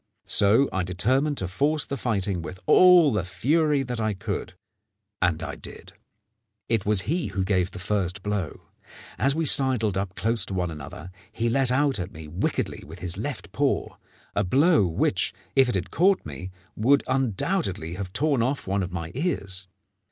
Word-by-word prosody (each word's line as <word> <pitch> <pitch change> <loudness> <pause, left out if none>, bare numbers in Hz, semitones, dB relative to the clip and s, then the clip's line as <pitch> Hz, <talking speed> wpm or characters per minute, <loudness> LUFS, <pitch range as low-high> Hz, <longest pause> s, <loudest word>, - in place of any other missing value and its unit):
So 110 +7 +4
I 95 - 0
determined 130 - 0
to 95 - -2
force 145 +10 +1
the 140 - -4
fighting 100 -7 -1
with 90 +2 -8
all 180 - +7
the 105 -5 0
fury 145 - +1
that 125 -2 -4
I 110 -2 0
could; 95 -2 -4 0.7
and 85 -3 +1
I 70 -2 -4
did. - - -9 0.7
It 110 -3 0
was 105 -2 +3
he 160 - -1
who 100 -1 -2
gave 95 -2 +1
the 100 - -10
first 95 0 -2
blow. 105 -6 -3 0.6
As 135 +2 +3
we 165 0 0
sidled 125 -8 +2
up 95 -1 -4
close 115 +1 +2
to 95 - -4
one 90 -2 -1
another, 80 +3 -9 0.2
he 115 +1 -1
let 130 0 +2
out 135 -2 +2
at 90 +2 -4
me 80 -6 -10
wickedly 85 +6 -2
with 80 +4 -11
his 90 -1 -3
left - - -5
paw, - - 0 0.4
a 100 - +2
blow 140 - +4
which, 80 - 0 0.2
if 135 -2 +5
it 120 - 0
had 95 - -3
caught 190 +3 +3
me, 95 - -7 0.3
would 135 +6 +3
undoubtedly 130 - -1
have 95 0 -5
torn 145 +1 +1
off 135 +4 -1
one 100 +1 0
of 90 -1 -4
my 85 -2 -5
ears. 100 - -3
105 Hz, 180 wpm, -25 LUFS, 90-135 Hz, 0.7 s, all